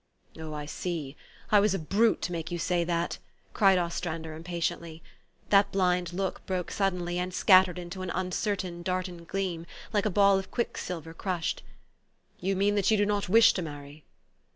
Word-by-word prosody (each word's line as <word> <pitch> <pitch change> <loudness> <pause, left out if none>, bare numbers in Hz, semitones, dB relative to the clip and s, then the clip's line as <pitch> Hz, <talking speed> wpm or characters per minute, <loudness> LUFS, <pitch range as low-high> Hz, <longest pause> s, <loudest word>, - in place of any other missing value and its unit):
1 160 - -9
'Oh, 155 -1 -6
I 150 0 -5
see! 155 -3 -4 0.4
I 210 - +7
was 200 -1 +2
a - - 0
brute 205 +8 +2
to - - -2
make 165 -1 -4
you 175 - -3
say 175 0 0
that," 170 0 -1 0.3
cried 195 -2 +5
Ostrander 170 -2 -3
impatiently. 165 0 -4 0.5
That 200 0 +5
blind 180 -2 +1
look 190 +1 -3
broke 185 -2 -2
suddenly, 180 -3 -1
and 180 +1 -2
scattered 185 -1 +5
into 180 +1 -6
an 185 - -4
uncer 185 +3 -1
tain, 175 -2 -5
darting 180 -1 -3
gleam, 175 -2 -3 0.3
like 210 0 +2
a - - +1
ball 200 0 +4
of 190 - -8
quicksilver 165 -8 -4
crushed. 175 -1 -2 0.8
"You 195 +2 0
mean 200 +2 +2
that 200 -2 +2
you 220 - +4
do 205 - +3
not 205 -2 -1
wish 225 +3 +7
to 185 - -2
marry?" 145 -1 -9
180 Hz, 180 wpm, -28 LUFS, 170-195 Hz, 0.8 s, I